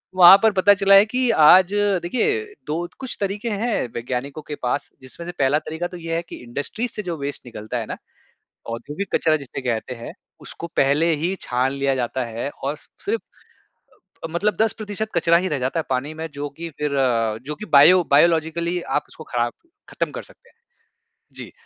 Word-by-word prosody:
वहाँ 185 Hz, +1 st, +10 dB
पर 220 Hz, -, +6 dB
पता 205 Hz, +2 st, +6 dB
चला 195 Hz, 0 st, +5 dB
है 200 Hz, +2 st, +8 dB
कि 250 Hz, +2 st, 0 dB, 0.2 s
आज, 185 Hz, +4 st, +7 dB
देखिए, 205 Hz, -, +1 dB, 0.2 s
2 170 Hz, +3 st, -2 dB
कुछ 260 Hz, -3 st, -6 dB
तरीके 205 Hz, +3 st, -2 dB
हैं 215 Hz, -, -1 dB
वैज्ञानिकों 130 Hz, +5 st, -4 dB
के 150 Hz, -, -4 dB
पास, 125 Hz, +2 st, -2 dB
जिसमें 130 Hz, +6 st, -10 dB
से -, -, -3 dB
पहला 140 Hz, +3 st, +3 dB
तरीका 160 Hz, +3 st, -4 dB
तो 180 Hz, -, -9 dB
ये 165 Hz, -1 st, -4 dB
है 165 Hz, -, 0 dB
कि -, -, -7 dB
इंडस्ट्रीज़ 145 Hz, -, -4 dB
से 210 Hz, -, -5 dB
जो 170 Hz, -3 st, -4 dB
वेस्ट 140 Hz, 0 st, -4 dB
निकलता 115 Hz, 0 st, -6 dB
है 115 Hz, -, -3 dB
ना, -, -, -6 dB, 0.7 s
औद्योगिक 145 Hz, +11 st, -4 dB
कचरा 155 Hz, -1 st, +3 dB
जिसे 135 Hz, -1 st, -7 dB
कहते 125 Hz, 0 st, -2 dB
हैं, 115 Hz, -, -8 dB, 0.3 s
उसको 170 Hz, -, -8 dB
पहले 145 Hz, +5 st, +3 dB
ही 180 Hz, +3 st, 0 dB
छान 125 Hz, +2 st, 0 dB
लिया 140 Hz, 0 st, 0 dB
जाता 130 Hz, +1 st, -2 dB
है 115 Hz, +4 st, -4 dB
और 140 Hz, +2 st, -1 dB
सिर्फ़ 440 Hz, +3 st, -5 dB, 1.0 s
अ, -, -, 0 dB
मतलब 205 Hz, +5 st, 0 dB
10% 215 Hz, -1 st, -2 dB
कचरा 170 Hz, 0 st, +4 dB
ही 185 Hz, +2 st, -1 dB
रह 150 Hz, -5 st, -1 dB
जाता 130 Hz, +6 st, -1 dB
है -, -, -6 dB
पानी 135 Hz, +4 st, -1 dB
में, 160 Hz, +1 st, -5 dB
जो 145 Hz, +1 st, -4 dB
कि 165 Hz, +4 st, -8 dB
फ़िर 150 Hz, -1 st, -1 dB, 0.6 s
जो 150 Hz, -, -3 dB
कि 215 Hz, -, -8 dB
बायो 170 Hz, +6 st, +8 dB
बायोलॉजिकली 170 Hz, +3 st, +2 dB
आप 150 Hz, -, -1 dB
उसको 155 Hz, -, -12 dB
ख़राब 120 Hz, -1 st, 0 dB, 0.4 s
ख़त्म -, -, -2 dB
कर -, -, -6 dB
सकते 480 Hz, -, -19 dB
हैं। -, -, -31 dB, 0.8 s
जी, -, -, -8 dB
165 Hz, 190 wpm, -22 LUFS, 140-195 Hz, 1.0 s, वहाँ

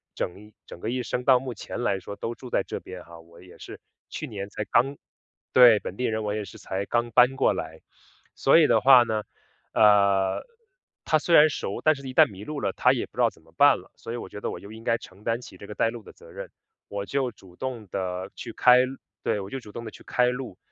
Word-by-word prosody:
整 105 Hz, +4 st, -6 dB
整 -, -, -11 dB
个 110 Hz, -, -4 dB
一 125 Hz, 0 st, -2 dB
生 125 Hz, +1 st, -3 dB
到 130 Hz, -2 st, +6 dB
目 130 Hz, -2 st, -6 dB
前 120 Hz, -, -7 dB
来 100 Hz, -5 st, 0 dB
说 100 Hz, -, -8 dB
都 115 Hz, +3 st, -4 dB
住 125 Hz, +1 st, -11 dB
在 -, -, +1 dB
这 -, -, -6 dB
边 90 Hz, -1 st, -10 dB
哈。 85 Hz, 0 st, -14 dB
我 85 Hz, +1 st, -17 dB
也 90 Hz, -, -16 dB
是 -, -, -11 dB, 0.3 s
去 -, -, -5 dB
年 100 Hz, -2 st, -6 dB
才 105 Hz, -, -4 dB
刚 135 Hz, +4 st, +2 dB, 0.5 s
对， 120 Hz, -4 st, +7 dB
本 95 Hz, -, -7 dB
地 125 Hz, -, -1 dB
人， 110 Hz, -1 st, -1 dB
我 105 Hz, 0 st, -2 dB
也 105 Hz, -1 st, -3 dB
是 -, -, -12 dB
才 95 Hz, +1 st, -4 dB
刚 120 Hz, +1 st, -1 dB
搬 125 Hz, +3 st, +5 dB
过 135 Hz, -, +3 dB
来。 80 Hz, -3 st, -6 dB, 0.5 s
所 135 Hz, -, +4 dB
以 155 Hz, -, +6 dB
的 115 Hz, -2 st, +4 dB
话 130 Hz, -1 st, +7 dB
呢， 110 Hz, -2 st, -2 dB, 0.5 s
呃， 100 Hz, -2 st, +4 dB, 0.6 s
她 155 Hz, -, +2 dB
虽 170 Hz, +2 st, +2 dB
然 155 Hz, +1 st, +8 dB
熟， 100 Hz, -, -4 dB
但 155 Hz, -, +5 dB
是 135 Hz, -1 st, -9 dB
一 130 Hz, -, -6 dB
旦 -, -, +7 dB
迷 100 Hz, +2 st, -10 dB
路 150 Hz, -2 st, -5 dB
了， 100 Hz, -2 st, 0 dB
她 -, -, +3 dB
也 -, -, -2 dB
不 -, -, -25 dB
知 -, -, +1 dB
道 -, -, +4 dB
怎 -, -, -23 dB
么 -, -, -24 dB
办 -, -, +7 dB
了。 -, -, -18 dB
所 115 Hz, -, -7 dB
以 -, -, -3 dB
我 -, -, -8 dB
觉 105 Hz, -, -8 dB
得 -, -, -3 dB
我 -, -, -7 dB
就 100 Hz, +2 st, -11 dB
应 110 Hz, +1 st, -11 dB
该 115 Hz, -1 st, +2 dB
承 100 Hz, -2 st, -15 dB
担 115 Hz, +2 st, -1 dB
起 95 Hz, -, -13 dB
这 100 Hz, -, -11 dB
个 105 Hz, -, -8 dB
带 115 Hz, -, +2 dB
路 115 Hz, -2 st, -8 dB
的 -, -, -14 dB
责 -, -, -17 dB
任， -, -, -8 dB, 0.4 s
我 100 Hz, 0 st, -5 dB
就 135 Hz, -1 st, -1 dB
主 90 Hz, -2 st, -18 dB
动 125 Hz, -5 st, -5 dB
地 95 Hz, 0 st, -4 dB
去 115 Hz, -2 st, -8 dB
开 125 Hz, 0 st, +5 dB
路 135 Hz, +1 st, -8 dB, 0.3 s
对， 105 Hz, -, 0 dB
我 95 Hz, -, -8 dB
就 135 Hz, -, -5 dB
主 105 Hz, -4 st, -13 dB
动 115 Hz, -, -6 dB
地 110 Hz, -, -7 dB
去 -, -, -15 dB
开 125 Hz, 0 st, +2 dB
路， 125 Hz, -6 st, -4 dB
110 Hz, 280 characters per minute, -25 LUFS, 100-125 Hz, 0.6 s, 然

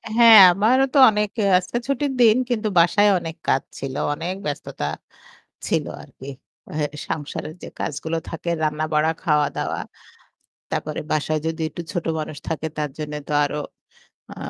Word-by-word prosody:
হ্যাঁ, 230 Hz, -2 st, +9 dB, 0.2 s
আমারও 240 Hz, +8 st, +3 dB
তো -, -, +2 dB
অনেক 210 Hz, 0 st, 0 dB, 0.3 s
আজকে 185 Hz, +5 st, -3 dB
ছুটির 280 Hz, +1 st, 0 dB
দিন 220 Hz, -1 st, +6 dB
কিন্তু 225 Hz, -3 st, -1 dB
বাসায় 205 Hz, +5 st, +4 dB
অনেক 165 Hz, -1 st, -7 dB
কাজ 135 Hz, -, +3 dB, 0.2 s
ছিল। 135 Hz, -1 st, -5 dB, 0.2 s
অনেক 170 Hz, +5 st, -4 dB
ব্যস্ততা 140 Hz, -, -4 dB, 0.8 s
ছিল -, -, 0 dB, 0.2 s
আরকি। 130 Hz, -, -13 dB, 0.7 s
এ -, -, -9 dB
সংসারের 155 Hz, +1 st, -5 dB
যে -, -, -6 dB
কাজগুলো 160 Hz, +3 st, -3 dB
থাকে 165 Hz, +1 st, -5 dB
রান্না-বাড়া, 155 Hz, +1 st, +1 dB
খাওয়া-দাওয়া। 150 Hz, -4 st, 0 dB, 0.9 s
তারপরে 155 Hz, 0 st, -3 dB
বাসায় 155 Hz, 0 st, 0 dB
যদি 160 Hz, 0 st, -3 dB
একটু 170 Hz, -, -7 dB
ছোট 175 Hz, -, -3 dB, 0.2 s
মানুষ 155 Hz, -1 st, -6 dB
থাকে 160 Hz, 0 st, -3 dB
তার 150 Hz, -2 st, -1 dB
জন্যে 150 Hz, -1 st, -4 dB
তো -, -, -3 dB
আরো 145 Hz, -, -3 dB, 0.8 s
আ -, -, -19 dB
160 Hz, 145 wpm, -22 LUFS, 150-205 Hz, 0.9 s, হ্যাঁ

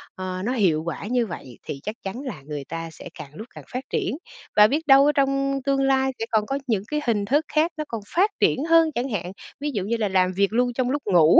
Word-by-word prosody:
ờ, 185 Hz, 0 st, -4 dB
nó 250 Hz, -, 0 dB
hiệu 170 Hz, -9 st, +2 dB
quả 170 Hz, -, -4 dB
như 245 Hz, -1 st, +1 dB
vậy 130 Hz, -8 st, -9 dB
thì 140 Hz, -, -5 dB
chắc 215 Hz, +1 st, -4 dB
chắn 200 Hz, +7 st, -5 dB
là 230 Hz, -, -6 dB
người 145 Hz, -2 st, -5 dB
ta 165 Hz, 0 st, -5 dB
sẽ 165 Hz, -, -10 dB
càng 145 Hz, +1 st, -9 dB
lúc 220 Hz, +6 st, -8 dB
càng -, -, -9 dB
phát 255 Hz, +1 st, -3 dB
triển, 285 Hz, -, -1 dB, 0.4 s
và 210 Hz, 0 st, +8 dB
biết 300 Hz, +4 st, -1 dB
đâu 275 Hz, +1 st, +8 dB
ở 295 Hz, -, +5 dB
trong 275 Hz, -1 st, +1 dB
tương 275 Hz, -1 st, +2 dB
lai 265 Hz, 0 st, +2 dB
sẽ 225 Hz, -, -1 dB
còn 215 Hz, -1 st, +2 dB
có 275 Hz, +3 st, -1 dB
những 210 Hz, -4 st, +1 dB
cái 300 Hz, 0 st, -1 dB
hình 205 Hz, -3 st, +1 dB
thức 290 Hz, +7 st, +2 dB
khác 320 Hz, +3 st, +3 dB
nó 305 Hz, -, -1 dB
còn 230 Hz, -2 st, -4 dB
phát 395 Hz, +5 st, +4 dB
triển 275 Hz, -, +3 dB
hơn 330 Hz, -1 st, +6 dB
chẳng 255 Hz, +3 st, -1 dB
hạn, 180 Hz, -4 st, -3 dB, 0.3 s
ví 295 Hz, 0 st, -2 dB
dụ 200 Hz, -4 st, -1 dB
như 230 Hz, +3 st, -1 dB
là 215 Hz, -2 st, 0 dB
làm 185 Hz, -1 st, +3 dB
việc 200 Hz, +3 st, +1 dB
luôn 245 Hz, +1 st, +2 dB
trong 250 Hz, 0 st, 0 dB
lúc 285 Hz, +2 st, -1 dB
ngủ 170 Hz, -5 st, +6 dB
235 Hz, 265 wpm, -24 LUFS, 185-275 Hz, 0.4 s, và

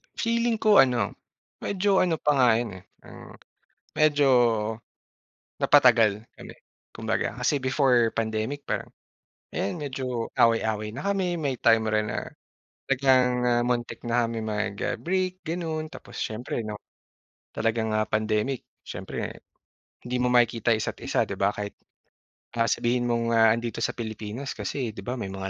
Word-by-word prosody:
Feeling 230 Hz, 0 st, +1 dB
ko 215 Hz, -1 st, +5 dB
ano, 125 Hz, -3 st, +3 dB, 0.5 s
medyo 195 Hz, 0 st, +1 dB
ano 180 Hz, -3 st, +2 dB
pa 150 Hz, -1 st, +1 dB
nga 125 Hz, -2 st, +5 dB
yun, 110 Hz, -6 st, -3 dB
eh, -, -, -21 dB, 0.2 s
parang -, -, -13 dB, 0.6 s
medyo 145 Hz, -2 st, +4 dB, 1.3 s
napatagal 115 Hz, -7 st, +5 dB
kami -, -, -11 dB, 0.4 s
kumbaga -, -, -2 dB
kasi 145 Hz, -, +2 dB
before 130 Hz, -4 st, +3 dB
pandemic, 110 Hz, +5 st, -3 dB
parang -, -, -3 dB, 0.6 s
ayan, 130 Hz, -, -2 dB
medyo 130 Hz, -5 st, -3 dB
away-away 110 Hz, -2 st, +2 dB
na 140 Hz, +10 st, -6 dB
kami. 185 Hz, -3 st, 0 dB
May 140 Hz, -4 st, -1 dB
time 115 Hz, -1 st, +3 dB
rin 110 Hz, -1 st, 0 dB
na -, -, -3 dB, 0.6 s
talagang, 130 Hz, -1 st, +4 dB, 0.2 s
ah, 120 Hz, 0 st, +3 dB
muntik 120 Hz, 0 st, -2 dB
na 120 Hz, 0 st, +1 dB
kaming 115 Hz, -1 st, -4 dB
mag, 105 Hz, -1 st, -2 dB
ah, -, -, -1 dB
break 185 Hz, +1 st, -1 dB
ganun 160 Hz, -2 st, -3 dB
tapos -, -, -10 dB
siyempre 115 Hz, +2 st, -3 dB
'no 105 Hz, -1 st, -5 dB, 0.8 s
talagang, 110 Hz, -1 st, 0 dB
ah, 110 Hz, -, +2 dB
pandemic 110 Hz, +4 st, -1 dB, 0.2 s
siyempre -, -, -6 dB, 0.7 s
hindi 125 Hz, +1 st, -2 dB
mo 125 Hz, -, +2 dB
yung 125 Hz, -, +3 dB
makikita 115 Hz, -1 st, +3 dB
isa't 110 Hz, -, -4 dB
isa -, -, +1 dB
'di -, -, -7 dB
ba, 100 Hz, -, +4 dB
kahit, 105 Hz, 0 st, -5 dB, 0.9 s
ah, 115 Hz, -, +3 dB
sabihin 120 Hz, +2 st, +1 dB
mong, 115 Hz, -1 st, 0 dB
ah, 115 Hz, -1 st, +5 dB
andito 115 Hz, 0 st, -4 dB
sa -, -, -1 dB
Pilipinas 110 Hz, +3 st, -5 dB
kasi 125 Hz, -6 st, -3 dB
di 100 Hz, -, -11 dB
ba, 125 Hz, -, -3 dB
may 100 Hz, -6 st, -5 dB
mga 95 Hz, 0 st, -5 dB
120 Hz, 150 wpm, -26 LUFS, 110-140 Hz, 1.3 s, ko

